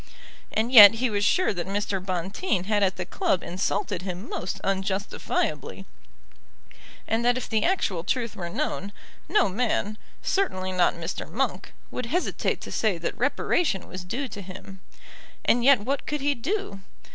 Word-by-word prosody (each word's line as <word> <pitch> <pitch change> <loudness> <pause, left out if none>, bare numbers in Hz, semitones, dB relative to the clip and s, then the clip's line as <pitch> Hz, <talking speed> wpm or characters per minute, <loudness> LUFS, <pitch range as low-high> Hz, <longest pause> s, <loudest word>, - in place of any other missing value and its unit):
And 225 +3 0
yet 215 -3 +11
he 245 +1 0
was 205 -1 0
sure 365 - +3
that 180 -1 -4
Mr. 195 -1 -2
Bonteen 185 - -1
had 205 +1 +1
at 190 -1 +2
the 185 - -4
club 180 0 0
insulted 185 +1 -2
him 185 +2 -6
most 190 +2 -4
unjustifiably, 195 +1 -2 1.2
and 225 +1 0
that 245 +1 +3
if 255 - -4
the 220 -2 +1
actual 205 - 0
truth 235 +2 -1
were 175 -4 -5
known, 200 +3 -3 0.4
no 420 -4 +4
man, 215 0 -1 0.2
certainly 185 - 0
not 180 -1 +2
Mr. 170 +1 -5
Monk, - - -2 0.2
would 250 - -4
hesitate 355 +9 -1
to - - -8
say 215 -6 +1
that 165 - -3
reparation 265 - 0
was 185 0 -7
due 250 +10 -3
to 205 -3 -8
him. 190 0 -10 0.6
And 240 0 +3
yet 265 -3 +6
what 275 +6 -2
could 295 -1 -2
he 285 +1 +2
do? 280 - -3
205 Hz, 160 wpm, -26 LUFS, 185-250 Hz, 1.2 s, yet